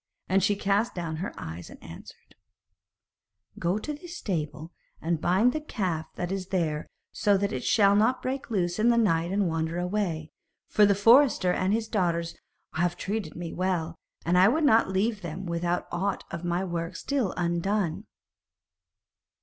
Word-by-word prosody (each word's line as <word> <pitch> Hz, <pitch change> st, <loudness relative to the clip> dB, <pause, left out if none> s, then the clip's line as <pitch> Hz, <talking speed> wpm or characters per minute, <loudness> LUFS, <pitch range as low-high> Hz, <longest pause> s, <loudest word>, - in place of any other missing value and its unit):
And 195 Hz, +1 st, +3 dB
she 205 Hz, +2 st, +2 dB
cast 200 Hz, +3 st, 0 dB
down 165 Hz, -3 st, -3 dB
her 185 Hz, +5 st, -4 dB
eyes, 80 Hz, +2 st, -7 dB
and -, -, -13 dB
answered: -, -, -12 dB, 1.3 s
'Go 175 Hz, +4 st, +1 dB
to 300 Hz, +8 st, -4 dB
the 315 Hz, +5 st, -10 dB
stable, 165 Hz, -, -4 dB, 0.3 s
and 165 Hz, -1 st, -1 dB
bind 200 Hz, +8 st, +3 dB
the 310 Hz, -, -2 dB
calf 185 Hz, -, -3 dB
that 175 Hz, +1 st, -3 dB
is 190 Hz, -2 st, -3 dB
there 160 Hz, -5 st, -1 dB, 0.2 s
so 205 Hz, -1 st, +2 dB
that 200 Hz, +1 st, -1 dB
it 130 Hz, -, -3 dB
shall 200 Hz, -2 st, +4 dB
not 225 Hz, +5 st, +3 dB
break 265 Hz, +1 st, -4 dB
loose 180 Hz, -4 st, -1 dB
in 230 Hz, +3 st, +4 dB
the 235 Hz, -, +4 dB
night 170 Hz, -6 st, +2 dB
and 200 Hz, -1 st, +1 dB
wander 165 Hz, 0 st, -2 dB
away, 180 Hz, -4 st, -2 dB, 0.4 s
for 210 Hz, -1 st, +5 dB
the 200 Hz, -, +3 dB
forester 225 Hz, -3 st, +5 dB
and 185 Hz, +1 st, 0 dB
his 220 Hz, +1 st, 0 dB
daughters 170 Hz, -5 st, -1 dB, 0.4 s
have 175 Hz, +2 st, 0 dB
treated 200 Hz, -6 st, -3 dB
me 170 Hz, -1 st, -6 dB
well, 175 Hz, -3 st, -1 dB, 0.3 s
and 175 Hz, +2 st, +3 dB
I 185 Hz, -, +7 dB
would 310 Hz, +8 st, +2 dB
not 230 Hz, -8 st, +4 dB
leave 200 Hz, +3 st, 0 dB
them 175 Hz, +2 st, -6 dB
with 170 Hz, 0 st, -3 dB
aught 175 Hz, +2 st, -1 dB
of 170 Hz, 0 st, -5 dB
my 175 Hz, +1 st, 0 dB
work 170 Hz, -1 st, -3 dB
still 265 Hz, -6 st, -1 dB
undone.' 175 Hz, +2 st, -1 dB
185 Hz, 170 wpm, -27 LUFS, 170-210 Hz, 1.3 s, I